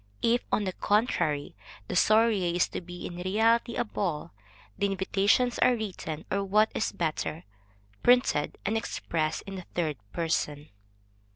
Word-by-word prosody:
If, 240 +1 +3
on 210 - +2
the 185 -2 -2
contrary, 175 -10 0 0.3
the - - -4
soirée 210 -3 +3
is 175 - +3
to - - -5
be 175 0 -8
in 175 - -6
reality 225 +6 +2
a - - +1
ball, 185 -9 -3 0.4
the 200 - +1
invitations 200 +5 +2
are 250 - +5
written, 180 -8 -5
or 200 +1 +1
what 210 +3 +3
is - - -1
better, 160 -1 -2 0.6
printed, 245 -12 +3
and 210 +3 0
expressed 160 -7 -2
in 195 -1 -6
the 185 - -8
third 155 -5 0
person. 150 -3 -2
190 Hz, 150 wpm, -28 LUFS, 170-220 Hz, 0.6 s, are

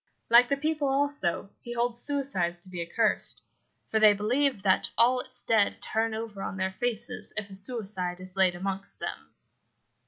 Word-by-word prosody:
Like 240 +1 +7
the 280 - +1
people, 305 -1 0
also, 270 -10 0
he 240 - -7
holds 240 0 0
suicides 260 -12 0
as 185 - -15
accursed; 180 +6 0 0.5
for 220 - +2
they 215 -1 +7
believe 240 +2 +1
that 190 -2 +3
all 250 +2 +5
its 255 0 -6
dead 220 -3 +2
turn 225 0 -1
over 220 -3 -6
on 195 - -4
their 190 0 -1
faces 235 +3 -2
if 205 -2 -4
a - - -9
suicide 195 -4 -3
is 185 0 -11
laid 190 -2 +3
amongst 195 +2 -4
them. - - -6
220 Hz, 165 wpm, -28 LUFS, 190-245 Hz, 0.5 s, Like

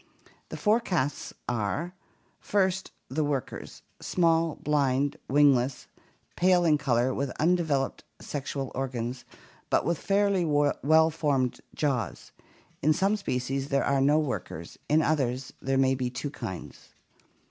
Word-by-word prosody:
The - - -6
four 215 +2 +3
castes 155 - -2 0.2
are: 120 - -2 0.5
First, 190 -2 0 0.2
the 150 +4 -1
workers: 140 -4 -4 0.2
small, 165 -2 +2
blind, 145 -1 +1
wingless, 135 -2 +3 0.5
pale 180 -1 +4
in 150 -3 +4
color, 125 -2 +1
with 140 +1 -2
undevel 160 -5 +2
oped - - -12 0.2
sexual 135 -2 -4
organs, 125 -1 -4 0.4
but - - +2
with 170 0 0
fairly 200 -2 +2
well 155 +1 +3
formed 140 -6 0
jaws. 125 - -2 0.5
In 155 +2 +4
some 195 +5 +2
species 135 -7 -2
there 140 -2 +1
are 140 -1 +2
no 145 +3 +4
workers, 100 - -4
in 155 +2 +4
others 130 -4 0
there 135 0 0
may 135 0 +4
be 130 -1 -1
two 135 +3 -5
kinds. 95 - -8
145 Hz, 130 wpm, -28 LUFS, 130-160 Hz, 0.5 s, pale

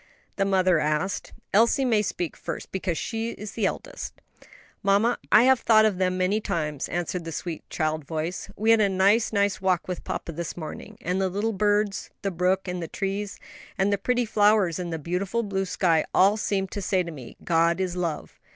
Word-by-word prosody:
the 195 - +1
mother 185 -3 +3
asked. 155 +6 -1 0.2
"Elsie 230 +6 +4
may 225 -4 +3
speak 175 -5 -3
first, - - -6
because 185 -3 -2
she 225 0 -3
is 210 -1 -8
the 215 -4 0
eldest." - - -5 0.7
"Mamma, 205 +5 +2
I 230 - +8
have 260 -1 +5
thought 220 -1 +5
of 200 -4 +1
them 185 -1 +1
many 190 +4 +1
times," 150 -7 -2
answered 175 0 -2
the 165 - -6
sweet 165 +1 -6
child 155 -1 -1
voice; 160 +4 -4
"we 220 +2 +2
had 225 -1 +5
a 200 - +3
nice, 195 +4 +3
nice 200 -3 +1
walk 185 -2 +1
with 180 -1 -4
papa - - -4
this 170 +2 -5
morning, 155 -3 -8
and 180 +2 -1
the 190 - +1
little 205 +4 -1
birds, 205 0 +1
the 195 - 0
brook, 185 +2 0
and 180 0 -3
the 165 - -4
trees, 195 +4 -3 0.4
and 195 +1 +2
the - - +2
pretty 245 +3 +1
flowers 205 -5 +3
and 175 -1 -4
the 165 - -2
beautiful 180 +8 -2
blue 195 -2 -1
sky 170 -3 +2
all 195 +3 +5
seemed 195 -3 -1
to 205 - -4
say 185 -1 +1
to 170 - -6
me, 130 -6 -10
'God 170 +1 +2
is 185 -2 -1
love.' 170 -4 -4
190 Hz, 200 wpm, -26 LUFS, 175-210 Hz, 0.7 s, I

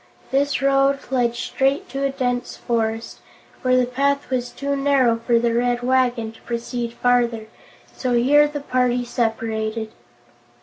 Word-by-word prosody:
This 275 +1 +1
road 275 0 +3
led 240 -2 +1
straight 270 +3 0
to 275 +2 -3
a 275 - +2
dense 250 -2 -2
forest, 225 -1 -2 0.4
where 255 0 +3
the 250 - +3
path 280 +3 -1
was 250 -1 -1
too 280 0 -3
narrow 275 -4 +3
for 235 +1 +1
the 235 0 +1
Red 245 +1 0
Wagon 245 -3 +1
to 225 - -19
proceed 235 0 -4
farther, 240 -3 +1 0.5
so 255 -2 -1
here 285 +5 +5
the 295 -1 -5
party 250 -2 0
separated. 225 -2 -2
245 Hz, 145 wpm, -22 LUFS, 235-275 Hz, 0.5 s, here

